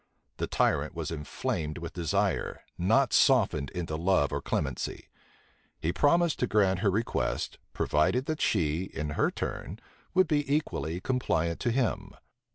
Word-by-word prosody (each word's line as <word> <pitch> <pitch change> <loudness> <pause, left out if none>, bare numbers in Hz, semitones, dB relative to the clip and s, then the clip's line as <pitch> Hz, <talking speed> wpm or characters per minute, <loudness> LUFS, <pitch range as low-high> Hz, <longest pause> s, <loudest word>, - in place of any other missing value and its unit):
The - - -2
tyrant - - +1
was - - -3
inflamed 75 0 -3
with 85 -1 -6
desire, 95 +2 -1
not 115 +9 +2
softened 95 - +4
into 85 -1 -4
love 85 -3 +2
or - - -1
clemency. 70 -4 -3 0.7
He 85 +2 -1
promised 170 +2 +3
to 125 - +1
grant 95 -4 +3
her 100 +1 +2
request, 110 +5 -1
provided 90 - +1
that 155 +1 -3
she, 85 -2 +1
in 75 -5 -5
her - - +2
turn, - - -5 0.4
would 185 -1 +5
be 145 -2 0
equally 90 - -1
compliant 85 -10 0
to 120 - 0
him. 120 -5 -1
95 Hz, 145 wpm, -29 LUFS, 80-125 Hz, 0.7 s, would